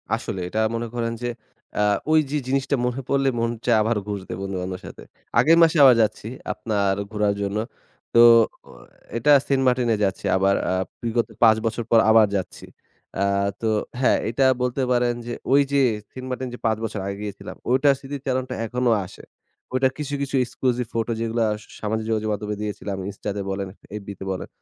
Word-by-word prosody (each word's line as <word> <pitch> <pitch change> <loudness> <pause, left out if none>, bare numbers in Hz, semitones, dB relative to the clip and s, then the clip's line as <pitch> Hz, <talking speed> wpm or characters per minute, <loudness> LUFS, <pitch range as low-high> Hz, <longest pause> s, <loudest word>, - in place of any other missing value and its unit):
আসলেই। 95 -2 -5
এটা 110 - -2 0.2
মনে 115 0 -3
করেন 115 -1 -1
যে, 120 - -1 0.5
আ - - +3 0.3
ঐযে 150 -2 +2
জিনিসটা 135 +1 +1
মনে 125 +2 -2
পড়লে 135 -1 +2
মন 115 0 +1 0.2
চায় 120 -2 +4
আবার 115 +1 +1
ঘুরতে 100 -2 -5
বন্ধু-বান্ধবের 95 -1 -4
সাথে। - - -11 0.4
আগামী 160 +7 +5
মাসে 165 0 +3
আবার 130 -3 +8
যাচ্ছি 110 0 -1 0.3
আপনার 100 -3 0 0.2
ঘুরার 105 -1 +1
জন্য। 100 +1 -2 0.6
তো 115 - +5 0.5
অ - - -12 0.4
এইটা 145 +5 +3 0.2
সেন্টমার্টিনে 125 -4 +2
যাচ্ছি 95 -1 -1
আবার 100 +1 +3
আ - - +1 0.3
বিগত 115 0 0 0.2
৫ 110 -1 +7
বছর 115 +1 -1
পর 115 - +7
আবার 110 -1 +6
যাচ্ছি। 95 - -4 0.6
আ - - +3 0.4
তো 110 - +1 0.3
হ্যাঁ, - - +4
এটা 130 +4 +2 0.2
বলতে 125 +2 0
পারেন 120 -1 +2
যে 120 - -4 0.2
ঐ - - +5 0.2
যে 140 -1 +3 0.3
সেন্টমার্টিন 130 0 -5
যে 120 - -8
৫ 110 -1 +2
বছর 110 -2 -3
আগে 100 0 -4
গিয়েছিলাম, 100 -1 -7
ঐটার 135 +3 +4
স্মৃতি 140 +1 -6
চারণটা 130 -1 -1
এখনো 125 +1 0
আসে। 90 - -13 0.5
ঐটা 130 0 +3
কিছু, 145 -1 -4
কিছু 140 0 -2
exclusive 125 -1 -1
ফটো 115 0 -1
যেগুলা 115 0 0 0.2
সা - - -20
সামাজিক 110 +1 -2
যোগাযোগ 110 -1 0
মাধমে 105 +1 -3
দিয়েছিলাম, 100 -1 -4
Insta 100 +1 -6
তে - - -2
বলেন, 95 0 -3 0.3
FB - - -18
তে - - -6
বলেন। 95 - -4
115 Hz, 180 wpm, -23 LUFS, 105-130 Hz, 0.6 s, আবার